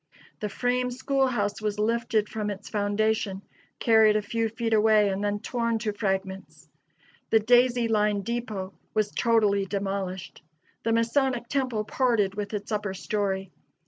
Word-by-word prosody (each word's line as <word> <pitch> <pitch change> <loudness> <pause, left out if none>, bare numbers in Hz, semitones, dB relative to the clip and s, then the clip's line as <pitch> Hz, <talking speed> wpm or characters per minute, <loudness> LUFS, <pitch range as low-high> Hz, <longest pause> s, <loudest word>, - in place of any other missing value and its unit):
The 210 -4 -3
frame 250 +4 0
school 270 +2 0
house 210 -4 -1
was 210 -1 -2
lifted 220 0 +1
from 210 -1 -3
its 205 0 -7
foundation, 205 -1 0 0.3
carried 220 -2 +5
a 215 - +2
few 225 +2 -1
feet 225 0 -2
away, 215 -1 +4
and 195 +1 -2
then 205 0 0
torn 230 0 -1
to 215 -2 -2
fragments. 195 -2 -3 0.6
The 220 - +5
Daisy 245 +1 +4
Line 210 -2 +1
depot 215 -4 -4 0.2
was 215 -1 +1
totally 210 -4 +2
demolished. 195 -1 -4 0.4
The 230 - -1
Masonic 240 +2 +1
Temple 255 -6 0
parted 220 -4 +1
with 205 0 -4
its 205 +2 -6
upper 205 -2 -2
story. 195 -1 -2
215 Hz, 145 wpm, -26 LUFS, 205-230 Hz, 0.6 s, carried